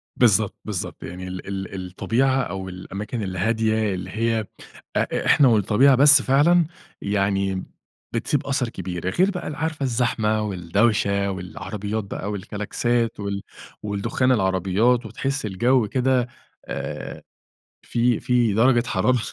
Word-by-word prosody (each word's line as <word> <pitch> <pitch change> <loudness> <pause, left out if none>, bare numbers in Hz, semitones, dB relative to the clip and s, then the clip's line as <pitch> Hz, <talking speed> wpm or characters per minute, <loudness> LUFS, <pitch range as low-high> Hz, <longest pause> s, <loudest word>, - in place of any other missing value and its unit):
بالضبط، 110 -4 +3
بالضبط. 105 -4 -5
يعني 90 +1 -7
ال 90 0 -7
ال 95 -1 -5
الطبيعة 125 +9 +1
أو 95 -5 -5
الأماكن 100 +5 -6
الهادية 110 +2 0
اللي 95 0 -5
هي 115 +1 0 0.5
أ - - 0
إحنا 140 - +5
والطبيعة 115 +4 +4
بس 145 +1 +7
فعلًا 155 +7 +4 0.4
يعني 100 -1 0 0.5
بتسيب 145 -2 -1
أثَر 130 -3 0
كبير. 90 -3 -4
غير 185 - +2
بقى 180 - -5
ال 150 - -4
عارفة 155 -2 -3
الزحمة 115 -4 +1
والدوشة 100 +1 +1
والعربيات 100 +3 -5
بقى 100 +1 -5
والكلاكسات 110 +4 -2
وال 100 -1 -3 0.4
والدخان 115 +5 0
العربيات 100 +4 +2
وتحِسي 135 +2 -3
الجَو 120 +4 +2
كده 125 +1 +1 0.4
آآ - - -6 0.6
فيه 120 0 +1
فيه 120 -4 +2
درجة 120 +2 +4
حرارة 125 +6 +2
110 Hz, 125 wpm, -23 LUFS, 95-125 Hz, 0.6 s, بس